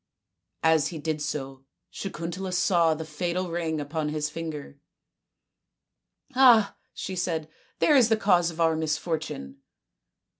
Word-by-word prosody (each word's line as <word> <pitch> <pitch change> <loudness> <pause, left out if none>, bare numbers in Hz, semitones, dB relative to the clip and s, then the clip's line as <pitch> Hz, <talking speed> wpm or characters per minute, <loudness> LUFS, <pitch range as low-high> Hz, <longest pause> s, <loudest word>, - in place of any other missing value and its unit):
As 160 -2 +4
he 170 - -6
did 155 0 -3
so 135 -3 -4 0.3
Sakuntala 185 0 -5
saw 170 -3 +3
the 160 +1 -6
fatal 175 +3 -2
ring 165 -2 -1
upon 150 +1 -2
his 150 0 -2
finger. 150 -3 -6 0.8
" 275 - -39
Ah," 240 -6 +6 0.2
she 190 - -5
said, 165 -3 -2 0.2
" - - -36
there 300 - +4
is 245 -4 +6
the 220 - +3
cause 180 -5 +3
of 165 0 -9
our 165 -1 +3
misfortune." 155 - -3
165 Hz, 140 wpm, -26 LUFS, 155-180 Hz, 0.8 s, Ah